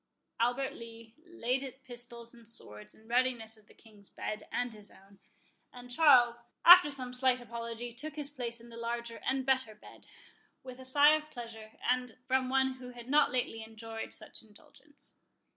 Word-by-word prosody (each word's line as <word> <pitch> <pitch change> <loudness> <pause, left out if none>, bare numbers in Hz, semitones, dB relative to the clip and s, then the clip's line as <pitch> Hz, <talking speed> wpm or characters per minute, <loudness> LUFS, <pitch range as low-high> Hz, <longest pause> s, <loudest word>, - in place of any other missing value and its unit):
Albert 245 +3 +1
Lee 230 -1 -11
laid 265 -5 -2
pistols 240 -2 -6
and 235 -2 -14
swords 105 - -9
in 220 - -21
readiness 240 -2 +1
by 215 - -18
the 210 - -21
King's 210 -3 -14
bed 215 0 -5
and 245 -1 -1
his 210 -2 -8
own; 195 0 -19 0.5
and 245 0 -11
Charles, 245 -5 +5 0.2
after 355 -2 +11
some 255 -3 -6
slight 255 0 +2
apology, 235 0 -6
took 300 +5 -6
his 295 -2 -4
place 240 -4 -4
in 235 +1 -14
the 230 - -11
larger 235 0 -3
and 265 0 0
better 260 -5 +1
bed, 210 - -16 0.6
with 255 -1 -9
a 260 - -9
sigh 290 +3 +7
of 305 0 -1
pleasure, 230 -4 -9
as 250 -1 +1
from 260 0 +2
one 265 0 +2
who 250 -1 -8
had 245 0 -11
not 295 -1 +5
lately 245 -3 -1
enjoyed 225 0 -7
such - - -6
an 225 - -17
indulgence. 280 +7 -15
240 Hz, 175 wpm, -32 LUFS, 230-260 Hz, 0.6 s, after